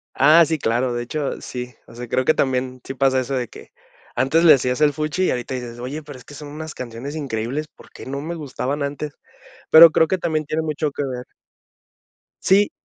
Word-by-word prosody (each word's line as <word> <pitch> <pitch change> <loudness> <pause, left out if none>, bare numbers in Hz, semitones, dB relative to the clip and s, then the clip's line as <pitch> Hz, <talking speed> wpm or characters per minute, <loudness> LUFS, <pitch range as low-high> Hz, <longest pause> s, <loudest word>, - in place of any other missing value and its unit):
Ah, 155 +5 +7
sí 160 +1 -1
claro, 120 -1 0
de 120 0 -2
hecho, 140 +3 -4
sí, 125 0 -6
o - - -16
sea, 120 +1 -7
creo 130 +3 0
que 155 - +5
también 130 -2 -1
sí 135 - -6
pasa 135 -1 +2
eso 130 +2 -2
de 125 -2 -2
que, - - -14 0.4
antes 135 +7 +2
le 165 - +9
hacías 125 +1 -1
el 150 -1 +4
fuchi 155 +4 -1
y - - +1
ahorita 125 +1 -3
dices: 120 -2 -6
"Oye, 135 +6 -5
pero 145 -3 -11
es 125 - -16
que - - -13
son 150 0 -9
unas 155 +2 -7
canciones 125 +4 -7
increíbles, 135 +1 -3
¿por - - -19
qué - - -11
no 140 +1 -4
me 165 +3 -4
gustaban 145 -2 -4
antes?", 145 +1 -4 0.6
pero, 165 +1 +10
creo 160 +1 +3
que 190 +4 -1
también 155 -3 -1
tiene 155 +2 -2
mucho 155 -1 -2
que 145 - -4
ver 125 -2 -5 1.2
Sí, 200 +2 +4
140 Hz, 220 wpm, -21 LUFS, 125-155 Hz, 1.2 s, pero